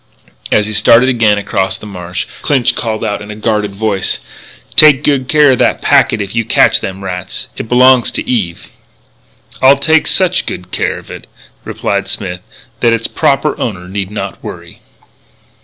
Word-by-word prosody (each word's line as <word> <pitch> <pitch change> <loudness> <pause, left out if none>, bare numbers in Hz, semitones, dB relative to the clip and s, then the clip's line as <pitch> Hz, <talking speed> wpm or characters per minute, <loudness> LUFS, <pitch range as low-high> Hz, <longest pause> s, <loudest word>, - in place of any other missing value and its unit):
As 105 - +3
he 110 - -4
started 115 +5 +4
again 115 -5 +2
across 95 -1 -2
the - - -12
marsh, 90 -3 -5 0.2
Clinch 135 -5 +1
called 110 -1 -3
out 105 -1 -3
in 105 - -10
a 105 - -7
guarded 105 -2 -2
voice: 100 -2 -1 0.6
"Take 150 -2 +6
good 140 -3 0
care 150 -1 +4
of 125 - 0
that - - +2
packet 110 -3 +3
if 100 - -8
you 115 0 0
catch - - +3
them 95 0 -6
rats. 90 -1 -6
It 110 - -7
belongs 125 0 +5
to - - -4
Eve." 95 -9 -2 0.9
"I'll 135 +1 +6
take 160 +3 +2
such 185 -1 +1
good 90 0 -6
care - - -1
of - - -12
it," - - -10 0.4
replied 100 -1 -3
Smith, 90 -2 -4 0.4
"that 115 -1 +3
its 115 0 -2
proper - - 0
owner 90 0 -4
need 95 0 -4
not 105 - -6
worry." - - -9
105 Hz, 175 wpm, -13 LUFS, 95-125 Hz, 0.9 s, Take